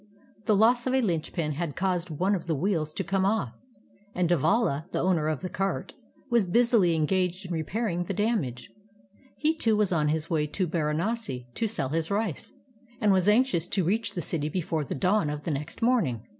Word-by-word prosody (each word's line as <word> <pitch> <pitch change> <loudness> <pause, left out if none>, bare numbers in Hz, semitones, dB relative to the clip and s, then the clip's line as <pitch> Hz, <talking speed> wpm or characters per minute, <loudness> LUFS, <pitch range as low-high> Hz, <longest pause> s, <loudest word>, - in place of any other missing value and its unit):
The 215 - +4
loss 235 +4 +4
of 260 - +1
a - - +4
Hnchpin 165 -4 -1
had 155 -1 -3
caused 180 -2 -1
one 180 +6 0
of 175 -4 -3
the 160 - +1
wheels 155 -1 0
to 195 - -2
come 190 +2 0
off, 195 - 0 0.6
and 180 -1 +1
Devala. 165 - +1
the - - -1
owner 170 -4 +1
of 155 -2 -1
the 185 - -3
cart, 195 +2 -3 0.3
was 235 -6 +2
busily 225 -4 +3
engaged 180 +4 0
in 180 - -7
repairing 175 +2 -2
the - - -3
damage. 200 - -1 0.7
He, 315 +1 +1
too, 225 -8 +2
was 210 -3 +2
on 155 -4 +2
his 155 +1 0
way 155 -2 0
to 185 +5 -1
Baranasi 160 - -2
to 225 - -1
sell 200 -11 -2
his 165 +2 -1
rice, 200 -6 -2 0.5
and 210 -2 +3
was 190 +1 +3
anxious 215 -6 +3
to 190 0 0
reach 205 +4 0
the 175 - -2
city 155 -2 -2
before 160 -2 -2
the - - -4
dawn 180 +2 +2
of 150 0 -4
the 165 - -2
next 145 +8 -4
morning. 175 - +2
180 Hz, 200 wpm, -27 LUFS, 155-210 Hz, 0.7 s, The